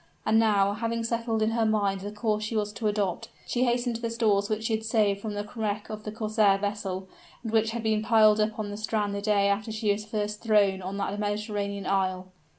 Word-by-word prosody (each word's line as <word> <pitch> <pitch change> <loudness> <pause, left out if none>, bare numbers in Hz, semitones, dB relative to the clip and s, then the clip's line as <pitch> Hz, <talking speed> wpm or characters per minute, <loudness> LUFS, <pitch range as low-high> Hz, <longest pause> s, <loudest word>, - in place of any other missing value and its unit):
And 220 +1 +4
now, 200 -3 +3
having 230 +2 -2
settled 230 -1 -1
in 220 - +1
her 230 0 +1
mind 205 -3 +1
the 205 +1 -5
course 215 0 -1
she 215 +2 -3
was 210 -1 -1
to 215 0 -2
adopt, 205 -4 -1 0.2
she 250 +1 +1
hastened 240 -1 0
to - - -13
the 230 - -1
stores 215 -3 +1
which 215 0 -1
she 225 - 0
had 220 0 -1
saved 210 -3 +1
from 210 -1 -4
the 205 0 -4
wreck 215 -1 -3
of 215 0 -7
the 210 - -4
corsair 215 -2 +2
vessel, 195 -2 -3 0.4
and 225 - -4
which 220 0 +3
had 230 0 -4
been 215 -1 +1
piled 215 -1 +5
up 215 0 0
on 210 -2 -3
the 205 - -5
strand 215 -1 -1
the 200 - -3
day 205 -1 +2
after 205 +2 0
she 215 -1 0
was 205 +1 -2
first 210 -1 -3
thrown 205 -4 +3
on 190 +2 -5
that 200 +1 -2
Mediterranean 205 -1 -2
isle. 185 -1 0
210 Hz, 235 wpm, -27 LUFS, 200-220 Hz, 0.4 s, piled